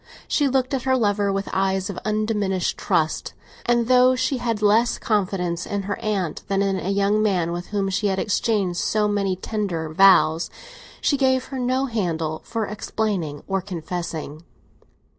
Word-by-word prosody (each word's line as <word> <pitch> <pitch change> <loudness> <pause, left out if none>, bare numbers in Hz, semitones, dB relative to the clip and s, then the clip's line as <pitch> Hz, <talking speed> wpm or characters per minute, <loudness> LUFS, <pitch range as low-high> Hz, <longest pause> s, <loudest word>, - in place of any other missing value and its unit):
She 290 - +2
looked 260 0 0
at 265 - 0
her 260 +1 +2
lover 205 -3 +1
with 195 0 -2
eyes 190 0 +1
of 200 -3 -5
undiminished 210 -4 0
trust, 165 -5 -1 0.3
and 240 -1 +2
though 255 0 +5
she 255 +2 0
had 230 -3 -2
less 220 +4 +3
confidence 180 -5 -1
in 200 -1 -2
her 205 +1 -3
aunt 195 -7 -2
than 195 0 +1
in 195 -1 0
a 185 - -3
young 200 +2 +2
man 180 -6 +1
with 175 +1 -5
whom 200 -2 -1
she 200 +2 0
had 190 -1 0
exchanged 195 -3 0
so 210 -1 +1
many 200 -2 0
tender 185 -5 -3
vows, 170 -2 +5 0.5
she 285 - +2
gave 260 -1 +2
her 265 - -2
no 255 +2 +1
handle 165 -10 -2
for 225 -1 -3
explaining 200 -7 -3
or 195 -1 0
confessing. 170 -4 -5
200 Hz, 165 wpm, -23 LUFS, 180-225 Hz, 0.5 s, though